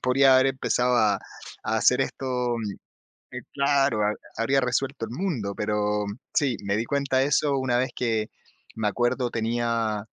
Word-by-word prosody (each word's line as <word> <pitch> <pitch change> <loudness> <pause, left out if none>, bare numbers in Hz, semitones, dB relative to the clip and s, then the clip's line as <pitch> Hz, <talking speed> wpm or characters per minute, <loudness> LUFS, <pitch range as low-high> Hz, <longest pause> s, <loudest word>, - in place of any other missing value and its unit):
podría 130 +1 +5
haber 130 +1 +4
empezado 125 -2 +1
a 105 -4 +4 0.5
a - - 0
hacer - - +4
esto 125 -2 -1 0.8
eh, - - -5
claro, 140 -5 +2
ha 105 - +1 0.2
habría 135 +4 +2
resuelto 130 0 -1
el 110 - -10
mundo". 125 - -2
Pero 105 0 0 0.3
sí, 135 -6 +1
me 100 0 0
di 115 - -1
cuenta 140 0 0
de 130 - +3
eso 145 0 +2
una 130 -2 +1
vez 130 +1 0
que 110 -3 -1 0.5
me 110 -1 -1
acuerdo 120 +4 0
tenía 115 -2 -1
120 Hz, 160 wpm, -25 LUFS, 110-135 Hz, 0.8 s, podría